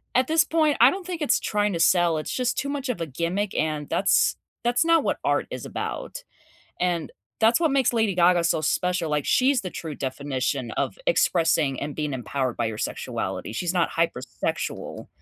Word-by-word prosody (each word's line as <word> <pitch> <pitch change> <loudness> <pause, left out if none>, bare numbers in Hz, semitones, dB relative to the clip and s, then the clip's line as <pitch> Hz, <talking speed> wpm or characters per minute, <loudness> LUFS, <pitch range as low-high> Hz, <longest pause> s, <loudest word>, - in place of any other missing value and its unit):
at 255 +1 +3
this 320 0 +4
point, 315 -2 +2
I 245 - +9
don't 380 -1 -6
think 350 -3 -5
it's 295 - +2
trying 210 -1 0
to 170 - -2
sell, 170 -1 +4
it's 155 - -4
just 250 -1 -1
too 280 - -1
much 280 -2 -3
of 220 - -2
a - - 0
gimmick 170 +8 -2
and 150 -2 -1
that's 195 - +3 0.3
that's 240 +4 +2
not 330 -2 +4
what - - -1
art - - +1
is - - -6
about. - - -5 0.6
And 175 -3 -1 0.3
that's 225 +5 +5
what 320 -4 +2
makes 265 -3 +2
Lady 220 -5 +1
Gaga 175 0 +4
so 170 - +2
special, 175 +1 0
like, 150 -1 0
she's 260 0 +3
the 185 - -5
true 160 -4 -6
definition 130 -2 -3
of - - -2
expressing 165 - +2
and 145 0 -4
being 150 -1 -2
empowered 130 0 -2
by - - 0
your 110 -1 -3
sexuality, 110 - -4
she's 175 +9 -2
not 175 -2 +2
hypersexual. 125 - -3
175 Hz, 195 wpm, -25 LUFS, -, 0.6 s, I